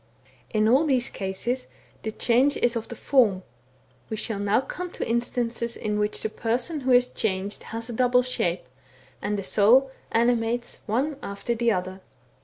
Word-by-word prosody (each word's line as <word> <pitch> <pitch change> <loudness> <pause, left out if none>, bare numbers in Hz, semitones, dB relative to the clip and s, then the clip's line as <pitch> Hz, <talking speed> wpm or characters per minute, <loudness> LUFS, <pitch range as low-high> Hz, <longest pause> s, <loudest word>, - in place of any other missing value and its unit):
In 215 0 +2
all 270 +7 +4
these 255 -4 +2
cases 205 +7 -3 0.3
the 220 - -3
change 255 +6 +2
is 240 0 +1
of 230 -1 -3
the 240 - -7
form: 215 -8 +2 0.7
we 220 - -3
shall 215 -1 -2
now 205 +2 +2
come 360 +7 -5
to - - -4
instances 235 0 -1
in 210 -1 -2
which 210 0 0
the 220 - 0
person 240 +8 0
who 260 -1 0
is 250 0 +6
changed 200 -4 -3
has 225 +1 -5
a 240 - -5
double 250 +1 +3
shape, 180 -8 -1 0.6
and 210 0 -1
the 200 - -3
soul 245 +8 +4 0.2
animates 235 0 +1
one 265 +7 0
after 200 +4 -3
the 235 0 +1
other. 185 -1 -3
235 Hz, 170 wpm, -25 LUFS, 210-250 Hz, 0.7 s, is